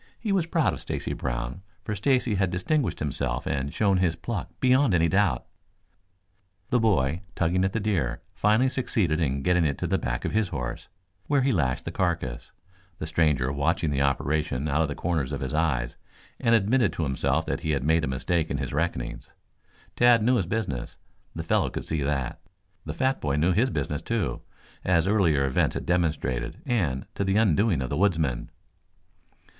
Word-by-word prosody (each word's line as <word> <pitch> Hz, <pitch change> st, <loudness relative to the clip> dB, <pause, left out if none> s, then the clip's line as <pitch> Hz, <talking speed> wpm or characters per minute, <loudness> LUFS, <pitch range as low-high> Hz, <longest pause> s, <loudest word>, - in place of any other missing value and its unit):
He 215 Hz, -, -2 dB
was 185 Hz, -4 st, +1 dB
proud 165 Hz, -2 st, +2 dB
of -, -, -6 dB
Stacy -, -, -3 dB
Brown, -, -, -4 dB, 0.2 s
for 105 Hz, -, -3 dB
Stacy 125 Hz, +3 st, +1 dB
had 95 Hz, -2 st, +1 dB
distinguished 125 Hz, -, 0 dB
himself 75 Hz, -3 st, -2 dB
and 70 Hz, 0 st, -2 dB
shown 100 Hz, 0 st, +2 dB
his 90 Hz, -3 st, +1 dB
pluck -, -, -4 dB
beyond 130 Hz, -4 st, +4 dB
any 85 Hz, 0 st, +3 dB
doubt. 95 Hz, -7 st, +1 dB, 1.3 s
The 125 Hz, -, +4 dB
boy, 90 Hz, -, +2 dB
tugging 90 Hz, +2 st, +1 dB
at 95 Hz, -, +1 dB
the 110 Hz, -, 0 dB
deer, 85 Hz, -, -1 dB
finally 110 Hz, +5 st, +3 dB
succeeded 105 Hz, -, 0 dB
in 70 Hz, -3 st, 0 dB
getting 90 Hz, +1 st, +3 dB
it 75 Hz, -3 st, 0 dB
to -, -, -3 dB
the -, -, +1 dB
back 65 Hz, -1 st, -3 dB
of -, -, -1 dB
his 110 Hz, -1 st, +1 dB
horse, 65 Hz, -9 st, -5 dB, 0.4 s
where 140 Hz, -2 st, +2 dB
he 135 Hz, -, +3 dB
lashed 70 Hz, -, 0 dB
the -, -, -3 dB
carcass, 85 Hz, -10 st, -2 dB, 0.5 s
the -, -, -4 dB
stranger 75 Hz, -5 st, +1 dB
watching 80 Hz, +3 st, 0 dB
the 70 Hz, -1 st, 0 dB
operation 70 Hz, 0 st, 0 dB
out 75 Hz, +2 st, +1 dB
of 80 Hz, -, +2 dB
the 70 Hz, -, -4 dB
corners 80 Hz, -7 st, -1 dB
of -, -, -3 dB
his 65 Hz, -2 st, -3 dB
eyes, 70 Hz, -7 st, 0 dB, 0.4 s
and 115 Hz, 0 st, +4 dB
admitted 110 Hz, +1 st, +3 dB
to 85 Hz, -, -2 dB
himself 70 Hz, +2 st, 0 dB
that -, -, -2 dB
he 80 Hz, -, -4 dB
had 70 Hz, -4 st, 0 dB
made 80 Hz, +2 st, +3 dB
a -, -, 0 dB
mistake 80 Hz, +6 st, -1 dB
in 70 Hz, -, -1 dB
his 70 Hz, -2 st, -4 dB
reckonings. 75 Hz, -6 st, -2 dB, 0.7 s
Tad 120 Hz, -2 st, +5 dB
knew 125 Hz, +2 st, +4 dB
his 95 Hz, -, -1 dB
business. 90 Hz, -, -3 dB, 0.4 s
The -, -, -4 dB
fellow -, -, +1 dB
could -, -, -5 dB
see 80 Hz, -2 st, -2 dB
that. 70 Hz, 0 st, -2 dB, 0.5 s
The 80 Hz, 0 st, -5 dB
fat 130 Hz, +5 st, 0 dB
boy 70 Hz, -2 st, 0 dB
knew 80 Hz, +5 st, +2 dB
his 115 Hz, +9 st, +2 dB
business, 75 Hz, -, -2 dB
too, -, -, -2 dB, 0.4 s
as 85 Hz, -3 st, +3 dB
earlier 85 Hz, -9 st, +3 dB
events 65 Hz, -, +1 dB
had -, -, -4 dB
demonstrated, 75 Hz, -9 st, -1 dB
and 80 Hz, -, 0 dB
to -, -, -2 dB
the 95 Hz, 0 st, +1 dB
undoing 100 Hz, -, +3 dB
of 65 Hz, -, -5 dB
the 70 Hz, -, -1 dB
woodsman. 80 Hz, -10 st, +1 dB
80 Hz, 190 wpm, -26 LUFS, 70-105 Hz, 1.3 s, Tad